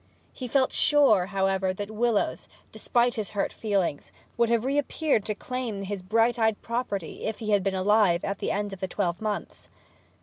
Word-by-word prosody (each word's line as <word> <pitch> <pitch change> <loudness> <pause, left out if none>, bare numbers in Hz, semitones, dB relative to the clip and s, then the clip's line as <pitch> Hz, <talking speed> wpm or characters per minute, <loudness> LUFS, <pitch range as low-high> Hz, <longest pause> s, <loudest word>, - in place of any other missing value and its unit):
He 255 - -6
felt 260 +1 +2
pretty - - +1
sure, 265 -11 +4
however, 190 -1 0
that 205 +2 -5
Willowes, 225 -1 0 0.2
despite 240 -1 +1
his 215 -5 -4
hurt 195 - 0
feelings, 195 -9 -1 0.2
would 235 0 +2
have 235 0 +1
reappeared 285 -2 +1
to 215 - -2
claim 240 -4 -4
his 200 0 -4
bright 225 +5 +2
eyed 220 -2 +2
property 230 -7 -3
if 220 - -2
he 215 -2 -3
had 205 -1 +4
been 195 0 -1
alive 190 -2 +3
at 200 0 -3
the - - -2
end 205 0 -2
of 195 - -8
the 190 - -2
twelve 175 -1 -2
months. 215 -1 -4
210 Hz, 190 wpm, -26 LUFS, 195-235 Hz, 0.2 s, sure